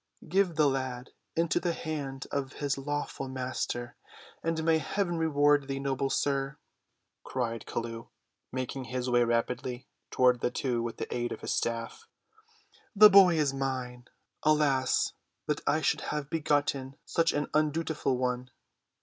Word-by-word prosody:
"Give 185 0 +2
the 150 -1 +4
lad 130 -2 -2 0.2
into 165 0 +2
the 175 -2 0
hand 145 -5 -4
of 140 -1 -2
his 145 -1 -1
lawful 145 -1 -3
master, 125 -2 -4 0.4
and 165 -1 -1
may 160 0 +3
heaven 175 +4 -1
reward 145 -3 +3
thee, 135 0 -3
noble 135 0 -1
sir," 135 0 0 0.7
cried 115 -3 -3
Chelluh, 115 0 -4 0.4
making 130 +1 -4
his 125 +1 -3
way 120 0 +5
rapidly 120 +1 -1 0.2
toward 125 -1 +4
the - - +1
two 125 -1 -1
with 115 0 -4
the - - -4
aid 120 0 -2
of - - -6
his - - -2
staff. 115 - -3 0.9
"The 210 +1 +9
boy 190 -3 +8
is 145 -3 +2
mine—alas, 135 +2 0 0.3
that - - -1
I - - +3
should - - +1
have 150 -1 -4
begotten 145 -4 0
such 165 -1 +2
an 145 0 0
undutiful 155 -3 +1
one. 125 0 -1
135 Hz, 140 wpm, -29 LUFS, 125-150 Hz, 0.9 s, The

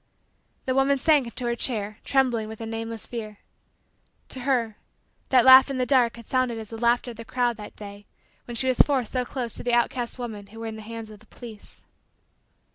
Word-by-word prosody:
The 260 - 0
woman 270 +1 +3
sank 290 -2 +3
into 240 +1 -5
her 235 0 0
chair, 215 -4 -2
trembling 250 -5 +1
with 220 0 -9
a 225 - -5
nameless 225 0 -5
fear. 215 -3 -6 0.9
To 260 - -4
her, 245 -4 0 0.5
that 255 -2 +5
laugh 260 +1 +9
in 270 - -2
the 255 - +1
dark 250 -3 +3
had 235 -1 -12
sounded 255 -2 0
as 220 -1 -8
the 225 - -6
laughter 240 +1 +2
of 230 - -12
the 230 - -7
crowd 245 0 0
that 210 -1 -10
day 205 0 -10 0.4
when 240 - -7
she 260 - -1
was 255 - +1
forced 265 -6 +3
so 255 -1 0
close 245 -2 -4
to - - -6
the 245 - 0
outcast 240 +1 0
women 220 -5 -6
who 225 +3 -12
were 225 - -5
in 220 -1 -5
the 220 - -8
hands 225 0 -8
of 210 - -12
the 220 - -21
police. 225 -4 -12
235 Hz, 215 wpm, -25 LUFS, 220-255 Hz, 0.9 s, laugh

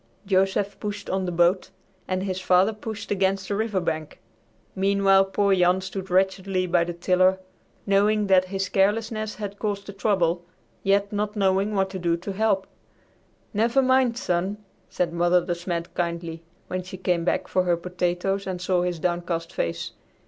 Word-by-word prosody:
Joseph 195 +1 +1
pushed 205 -1 -5
on 190 0 0
the 180 - -2
boat 175 +2 +2 0.4
and 185 0 -1
his 185 -1 -2
father 185 +4 +4
pushed 215 -1 -7
against 195 -1 +1
the 200 - -1
river 215 -2 0
bank. 160 -3 -3 0.6
Meanwhile 195 0 +4
poor 200 +1 +1
Jan 180 0 +3
stood 190 0 -6
wretchedly 190 0 +1
by 170 -1 +2
the 175 - -4
tiller 185 +2 +3 0.5
knowing 205 +1 +3
that 190 -2 +4
his 195 +1 -2
carelessness 215 +3 0
had 205 -1 -6
caused 205 -2 -2
the 200 - -8
trouble, 180 -4 +1 0.4
yet 200 +1 +1
not 210 +1 -2
knowing 195 +1 +1
what 190 -1 +1
to 190 - -5
do 170 -1 +1
to 185 +4 -6
help. 200 -1 +1 0.9
"Never 230 +5 +2
mind, 260 -2 +3
son," 190 -4 -1 0.3
said 175 -2 -1
Mother 175 +1 +3
De 175 - 0
Smet 170 -1 -4
kindly, 170 -1 -3 0.2
when 185 0 -3
she 185 +1 -9
came 180 -2 0
back 180 - 0
for 185 - +1
her 175 -2 +1
potatoes 180 +2 -2
and 185 -1 -3
saw 180 0 +1
his 180 -1 -1
downcast 175 -1 -2
face. 85 0 -3
190 Hz, 170 wpm, -25 LUFS, 180-200 Hz, 0.9 s, father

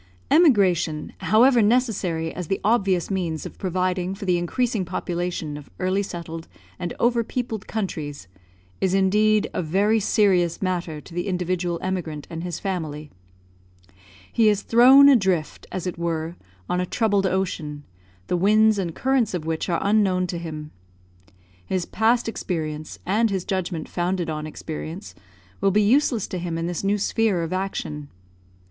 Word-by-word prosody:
Emigration, 190 - +3
however 240 +3 +5
necessary 205 -8 +1
as 180 -2 -5
the 195 - -1
obvious 200 -5 +2
means 170 -5 -2
of - - -9
providing 185 0 -1
for 200 0 -7
the 180 -2 +2
increasing 225 +4 -1
population 175 -4 -3
of 145 - -12
early 185 +2 0
settled 165 -4 -6 0.3
and 175 -2 -3
over 235 0 +2
peopled 230 -3 -4
countries, 150 - -4 0.5
is 190 0 +1
indeed 210 +2 +3
a - - -1
very 200 +7 +2
serious 190 -5 +2
matter 175 -5 -2
to - - -14
the 175 +3 -3
individual 180 -1 -1
emigrant 170 -6 -3
and 165 0 -5
his 175 -2 -4
family. 155 -6 -4 1.2
He 225 -2 +5
is 205 -1 +1
thrown 260 +4 +7
adrift, 190 - +2
as 185 - -4
it 180 -2 -4
were, 165 0 -2 0.3
on 180 - 0
a 180 - -2
troubled 205 -3 +1
ocean, 165 -6 -2 0.4
the - - -1
winds 215 +3 +4
and 170 -4 -3
currents 255 -6 +1
of 160 -3 -4
which 160 +2 -2
are 170 - +1
unknown 195 -3 +2
to 170 - -3
him. 155 -2 -7 0.9
His 175 - -2
past 230 +2 +1
experience, 155 -8 -4
and 220 +5 +2
his 190 -3 -2
judgment 180 -5 -2
founded 175 -1 -1
on 155 0 -4
experience, 160 +4 -7 0.5
will 195 - +4
be 210 +2 +3
useless 240 -1 +3
to 185 - -3
him 170 -1 -3
in 165 - -2
this 175 +1 -3
new 200 +1 +2
sphere 210 -3 +1
of 165 +2 -3
action. 155 -6 -4
185 Hz, 155 wpm, -23 LUFS, 165-210 Hz, 1.2 s, thrown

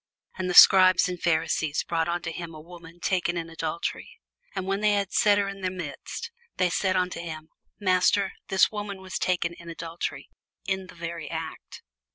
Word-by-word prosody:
And 185 -1 -3
the 180 - -1
scribes 185 -1 +8
and 180 -1 -5
Pharisees 160 -2 +1
brought 165 -1 -1
unto 170 -1 -2
him 165 -1 -7
a - - -9
woman 170 +1 -13
taken 175 -1 0
in 165 -1 -5
adultery; 165 +1 -4 0.5
and 190 -1 -2
when 195 +1 -1
they 210 -1 +3
had 200 -2 -1
set 205 -1 +4
her 200 -1 +1
in 195 0 -7
the 185 - 0
midst, 175 -6 -6 0.3
they 180 -1 +2
say 190 - +1
unto 180 -2 -1
him, 160 -2 -7 0.3
Master, 190 0 +2
this 190 - +4
woman 205 -2 -5
was 190 0 -5
taken 175 -2 0
in 170 0 -12
adultery, 165 0 -5 0.4
in 190 -1 -2
the 185 - -14
very 170 -1 -6
act. 160 -1 -7
175 Hz, 185 wpm, -26 LUFS, 165-190 Hz, 0.5 s, scribes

